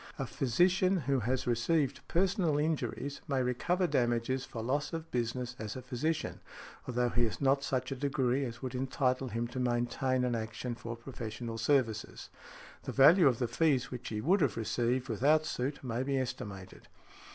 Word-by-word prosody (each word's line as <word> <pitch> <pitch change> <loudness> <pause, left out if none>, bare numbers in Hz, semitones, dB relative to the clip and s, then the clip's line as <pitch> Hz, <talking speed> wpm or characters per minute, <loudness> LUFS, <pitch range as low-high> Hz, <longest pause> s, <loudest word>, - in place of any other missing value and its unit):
A - - -2
physician, 180 +8 +2
who 135 0 +1
has 125 +2 -1
received 130 +5 +1
personal 180 -4 +2
injuries, 150 -2 -2
may 135 -3 +1
recover 175 +9 +1
damages 120 -2 0
for 115 -3 -6
loss 145 +7 -1
of 165 0 -5
business 125 +1 -2
as 110 0 -5
a 130 - -5
physician, 155 +6 -2 0.5
although 125 0 +1
he 120 0 +2
has 110 - -4
not 140 0 +3
such 130 -1 -1
a - - -1
degree 135 -1 0
as 120 0 -6
would 130 -1 -3
entitle 130 0 0
him 115 +1 -2
to 130 - -5
maintain 125 +1 0
an 125 -1 0
action 110 +2 -3
for 115 0 -6
professional 115 -1 -6
services. 115 -3 0 0.5
The - - -5
value 155 +5 +7
of 125 -4 +3
the 120 - 0
fees 135 +1 +1
which 125 -1 -6
he 105 -1 -3
would 185 - +3
have 135 -8 +1
received 120 +3 0
without 145 +7 +3
suit 135 0 -3
may 120 -1 -2
be 135 +1 0
estimated. 120 -7 -5
130 Hz, 175 wpm, -32 LUFS, 120-140 Hz, 0.5 s, value